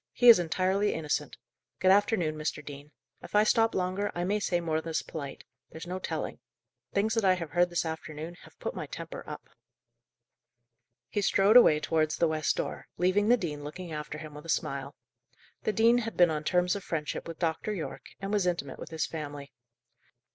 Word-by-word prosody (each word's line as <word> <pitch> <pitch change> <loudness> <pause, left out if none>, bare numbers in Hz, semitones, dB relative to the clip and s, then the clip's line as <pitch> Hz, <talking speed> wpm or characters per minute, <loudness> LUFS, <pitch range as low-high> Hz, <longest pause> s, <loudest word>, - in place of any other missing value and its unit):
He 245 0 +6
is 230 - +10
entirely 185 +4 +1
innocent. 150 -2 -2 0.4
Good 185 - +5
afternoon, 195 -5 +3
Mr. 150 -1 -3
Dean. 145 +1 -9 0.3
If - - -8
I 210 - +6
stop 225 +1 +3
longer, 185 +2 -1
I 175 - -1
may 205 +4 +1
say 180 -4 0
more 160 -2 -1
than's 165 0 -2
polite; 140 -4 -7 0.3
there's 160 - -9
no 180 +1 -4
telling. - - -4 0.5
Things 215 +2 +1
that 225 -1 +1
I 190 -1 +5
have 170 -4 -6
heard 175 +1 +3
this 175 0 -1
afternoon 160 0 -5
have - - -17
put - - -4
my - - -5
temper - - -7
up." - - -8 1.6
He 205 - -1
strode 200 +2 +4
away 160 -11 +8
towards 155 0 0
the 170 - +3
west 155 -1 0
door, - - -4
leaving 190 +4 +2
the 245 - +6
dean 150 -8 -4
looking 170 +4 -7
after 150 0 -5
him 155 -1 -9
with 150 +2 -10
a - - -10
smile. - - -2 0.7
The - - +2
dean 230 +3 +4
had 225 -1 -5
been 175 -2 +6
on 155 -1 -2
terms 180 +2 +2
of 200 - -5
friendship 155 -1 -3
with 165 -1 -7
Dr. 165 +4 -1
Yorke, 190 -6 -5
and 195 +1 -4
was 200 -3 +2
intimate 155 -7 -2
with - - -8
his 160 -1 -1
family. 145 -3 -7
175 Hz, 195 wpm, -29 LUFS, 155-200 Hz, 1.6 s, is